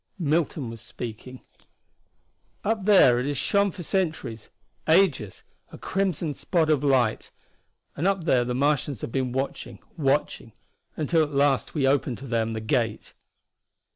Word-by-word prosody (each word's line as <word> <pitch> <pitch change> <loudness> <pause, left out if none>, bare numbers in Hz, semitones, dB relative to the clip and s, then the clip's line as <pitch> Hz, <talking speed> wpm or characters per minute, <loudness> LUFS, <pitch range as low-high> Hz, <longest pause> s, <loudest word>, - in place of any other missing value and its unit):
Milton 155 -6 -1
was 115 -1 -10
speaking. 120 +2 -8 1.2
"Up 215 -2 -1
there 160 - +6
it 125 - -2
has 145 -1 -2
shone 200 +8 +2
for 175 -1 -8
centuries 155 - -2 0.4
ages 160 - +2 0.3
a - - -10
crimson 180 -5 -2
spot 160 0 0
of 145 -2 +1
light. 130 -6 +1 0.7
And 165 +6 0
up 195 -3 +1
there 130 -6 +3
the 125 0 -3
Martians 140 -2 0
have - - -5
been 130 -1 -1
watching, 135 +2 -4 0.2
watching 135 -5 -1 0.4
until 160 +1 +2
at 145 -2 -2
last 140 +1 +1
we 140 -3 +1
opened 135 -3 +1
to 135 - -10
them 115 -2 -1
the 110 - -4
gate." 115 0 -1
140 Hz, 145 wpm, -25 LUFS, 120-165 Hz, 1.2 s, there